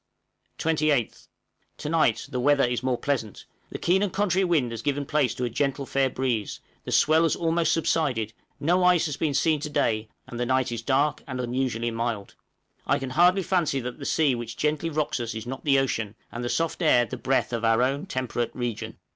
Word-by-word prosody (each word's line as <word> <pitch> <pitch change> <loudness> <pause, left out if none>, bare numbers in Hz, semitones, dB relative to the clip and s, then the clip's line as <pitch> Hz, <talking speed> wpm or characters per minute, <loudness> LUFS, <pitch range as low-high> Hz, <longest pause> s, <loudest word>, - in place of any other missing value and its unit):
28th. 155 -6 0 0.5
To 150 - -6
night 155 -8 +2
the 125 - -2
weather 145 +2 +3
is 120 -1 0
more 130 -1 0
pleasant; 115 -8 -3 0.2
the - - -5
keen 185 +3 +2
and 205 -2 0
contrary 195 -1 +1
wind 155 -10 +1
has 115 -1 -5
given 145 +2 -1
place 135 -5 +1
to 125 - -4
a 120 - 0
gentle, 140 +2 -1
fair 135 0 +1
breeze, 125 -5 -2 0.3
the - - -5
swell 155 +1 +4
has 165 - +2
almost 165 -1 +1
subsided, 135 -9 0 0.3
no 175 +5 +2
ice 180 -2 +4
has 150 -3 -2
been 145 -1 -1
seen 155 +2 +2
to 150 - -5
day, 110 -6 0 0.2
and 120 -2 -8
the 120 - 0
night 130 -1 +1
is 115 -1 -3
dark 140 +4 +1
and 130 -2 -5
unusually 120 -2 -1
mild. 115 -3 -3 0.5
I - - +3
can 135 -1 -5
hardly 180 +6 +4
fancy 165 -7 +1
that 125 0 -6
the - - -7
sea 150 -4 +2
which 120 -1 -5
gently 155 +2 0
rocks 155 -4 -1
us 115 -2 -4
is 110 - -5
not 130 +4 -7
the 140 -2 +4
ocean, 110 -6 -1 0.2
and 120 - -5
the 120 - -2
soft 165 +5 -1
air 125 -7 +4
the 110 - -6
breath 130 -1 0
of 115 0 -2
our 115 +1 +3
own 140 +7 -1
temperate 125 -5 -3
region! 120 -3 -4
135 Hz, 210 wpm, -26 LUFS, 120-155 Hz, 0.5 s, swell